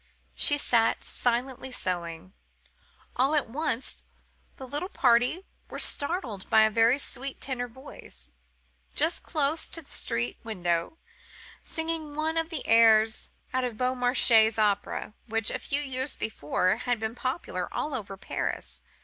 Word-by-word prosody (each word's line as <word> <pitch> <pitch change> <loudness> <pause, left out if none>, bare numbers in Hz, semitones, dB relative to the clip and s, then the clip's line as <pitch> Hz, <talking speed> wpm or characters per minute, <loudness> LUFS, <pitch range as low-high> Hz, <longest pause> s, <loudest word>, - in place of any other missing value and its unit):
She 290 - +3
sat 230 -5 +2
silently 250 +2 -1
sewing. 170 - -3 0.8
All 270 +5 +3
at 295 - +2
once 260 0 -2 0.5
the 265 - -8
little 295 +8 -3
party 250 +6 +3 0.2
were - - -6
startled 285 - -1
by 220 0 +6
a 220 - +3
very 230 +4 +4
sweet 270 -1 -4
tenor 250 -2 -3
voice, 225 - -12 0.6
just 320 +4 +1
close 305 0 -1
to 330 - -5
the - - -17
street 120 +1 -2
window, 175 - -1 0.7
singing 320 -2 -3
one 315 +1 0
of 325 0 0
the 320 -5 -4
airs 220 -1 +5 0.2
out 255 0 +1
of 240 -3 -3
Beaumarchais' 245 -3 +4
operas, 205 0 0
which, 225 -1 0
a - - -3
few 285 +1 -2
years 265 0 -1
before, 185 -1 0
had 245 -1 -1
been 220 0 -2
popular 255 +6 -3
all 300 - -2
over 200 -6 -5
Paris. - - -4
245 Hz, 140 wpm, -28 LUFS, 220-285 Hz, 0.8 s, by